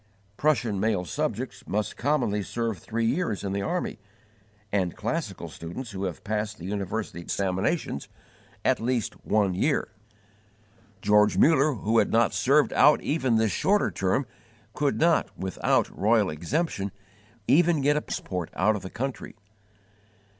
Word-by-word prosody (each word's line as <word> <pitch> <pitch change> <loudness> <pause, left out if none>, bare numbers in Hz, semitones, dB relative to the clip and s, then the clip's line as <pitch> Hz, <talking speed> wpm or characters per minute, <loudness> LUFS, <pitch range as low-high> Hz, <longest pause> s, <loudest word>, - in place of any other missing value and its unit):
Prussian 120 -8 +1
male 100 -3 0
subjects 130 - -3
must 105 +1 -2
commonly 120 -7 0
serve 115 -1 -3
three 115 +6 -2
years 120 - 0
in 100 - -2
the 100 0 -1
army, 175 - -2 0.7
and 95 -4 0
classical - - -3
students 110 +9 -7
who 95 -1 -4
have 90 -3 -5
passed 105 0 -2
the 85 - -9
university 100 -2 -3
examinations, 95 - -1 0.6
at - - +3
least 120 -1 -1
one 100 -3 +2
year. 135 - 0 1.1
George 105 0 +4
Muller, 155 -1 +5
who 115 +1 +2
had 105 - +1
not 115 -1 +3
served 135 +10 +3
out 150 +2 +6
even 130 -6 +1
this 110 -2 +2
shorter 205 +2 +2
term, 95 +9 0 0.5
could 145 -2 0
not, 170 0 +2
without 95 -1 +1
royal 105 -2 +3
exemption, 100 - -2 0.6
even 170 0 +4
get 145 +2 +3
a 150 - +1
passport 90 - -4
out 110 0 +3
of 105 - -4
the 95 - -7
country. 135 +2 -5
110 Hz, 140 wpm, -26 LUFS, 100-140 Hz, 1.1 s, out